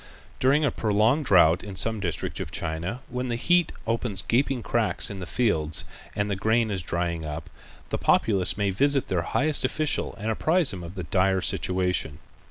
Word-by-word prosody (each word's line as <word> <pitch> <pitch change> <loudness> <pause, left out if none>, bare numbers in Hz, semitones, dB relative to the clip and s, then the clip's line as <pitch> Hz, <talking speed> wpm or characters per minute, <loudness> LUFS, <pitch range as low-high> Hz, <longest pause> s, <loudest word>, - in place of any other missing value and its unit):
During 140 +4 +3
a 140 - +1
prolonged 110 +8 +1
drought 90 -5 +4
in 100 -2 -8
some 110 +6 0
district 90 -5 -4
of - - -4
China, 85 +8 -4
when 125 +1 -4
the 120 - -2
heat 175 +7 +2
opens 115 -4 -2
gaping 130 0 0
cracks - - +1
in 100 - -7
the 90 - -6
fields 80 -11 0 0.3
and 100 0 -1
the 100 - -1
grain 110 +3 +1
is 95 -2 -2
drying 85 -1 -2
up, 75 0 -6 0.4
the - - -2
populace 100 -4 +2
may 100 -1 0
visit 140 +7 +1
their 90 -3 0
highest 150 - +1
official 150 +3 -1
and 110 +2 -3
apprise 160 - +3
him 90 - -6
of 85 +3 -9
the 90 - -5
dire 95 +4 +1
situation. 90 -5 -1
100 Hz, 180 wpm, -25 LUFS, 90-125 Hz, 0.4 s, drought